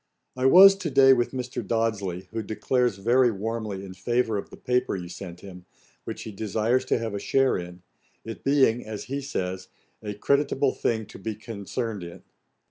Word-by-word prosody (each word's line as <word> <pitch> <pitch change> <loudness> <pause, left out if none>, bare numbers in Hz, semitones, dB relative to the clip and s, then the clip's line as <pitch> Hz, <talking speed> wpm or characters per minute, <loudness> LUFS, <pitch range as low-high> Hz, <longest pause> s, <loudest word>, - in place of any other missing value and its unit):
'I 130 +1 +2
was 195 +6 +9
to 180 -4 -3
day 135 -1 +6
with 120 -2 +1
Mr. 125 -1 -4
Dodsley, 100 -6 -2
who 110 0 -3
declares 120 +1 0
very 120 +5 +3
warmly 105 -2 -4
in 95 - -9
favour 115 +4 0
of 100 - -4
the - - -12
paper 125 -3 0
you 90 -2 -6
sent 90 0 -9
him, 90 -2 -12 0.4
which - - -6
he 110 - -7
desires 110 +5 0
to - - +1
have 115 -2 -4
a 100 - -3
share 135 +5 +2
in, 90 0 -7 0.4
it 115 0 -8
being, 135 -4 +3
as 110 -1 -6
he 140 +2 -4
says, 95 -9 -4 0.3
a 105 -1 -5
creditable 140 +3 +1
thing 110 -2 -1
to - - -13
be 110 +2 -4
concerned 110 0 -5
in. 85 +1 -10
110 Hz, 185 wpm, -26 LUFS, 100-130 Hz, 0.4 s, was